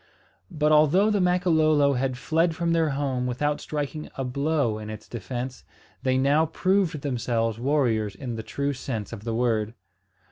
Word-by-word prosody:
But 155 -4 +1
although 155 +8 +5
the 205 -2 +2
Makololo 160 -5 +3
had 130 0 -1
fled 165 +4 +1
from 170 0 0
their 165 -2 +2
home 135 -3 -1
without 145 +4 -1
striking 150 0 -4
a 135 - -3
blow 140 -3 0
in 105 0 -7
its 110 0 -8
defence, 120 +4 -5 0.4
they 130 -1 +1
now 145 +4 +3
proved 185 -2 +1
themselves 115 -4 -1
warriors 120 -7 +1
in 120 +3 -5
the 110 - -4
true 140 +5 -2
sense 115 -5 -5
of 110 -1 -8
the 115 -1 -2
word. 115 -2 0
140 Hz, 165 wpm, -25 LUFS, 120-155 Hz, 0.4 s, although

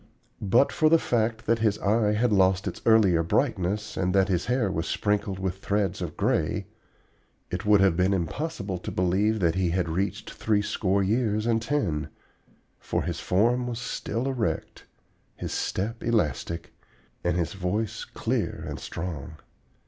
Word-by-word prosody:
But 110 +7 +3
for 155 -2 +3
the 165 - +6
fact 115 -5 0
that 115 +1 +2
his 110 -2 +2
eye 105 +1 +2
had 110 +1 +2
lost 95 0 +3
its - - -5
earlier 105 -7 +5
brightness 105 - 0
and 90 0 0
that 95 0 +4
his 90 0 0
hair 125 -5 +1
was 80 -2 -2
sprinkled 105 -2 0
with 95 0 -3
threads 100 -1 -1
of 85 -4 -5
gray, - - 0 0.9
it 95 +4 -3
would 105 -2 +6
have 95 -3 +4
been 95 +2 +2
impossible 100 - -2
to - - -6
believe 100 +5 +1
that 85 -2 +3
he 95 -1 +1
had 90 0 0
reached 95 +4 -2
three 105 -2 0
score 100 -2 +1
years 110 +1 +1
and 115 -1 +2
ten, 100 - -1 0.7
for - - -2
his - - -3
form 120 +6 +2
was 120 -2 -3
still 120 0 -3
erect, 130 -5 -2 0.5
his - - -5
step 110 +5 -2
elastic, 85 - -1 0.5
and 85 0 +1
his 85 +3 -1
voice 100 +3 -2
clear - - -2
and - - -5
strong. 80 -3 -6
100 Hz, 160 wpm, -26 LUFS, 90-110 Hz, 0.9 s, the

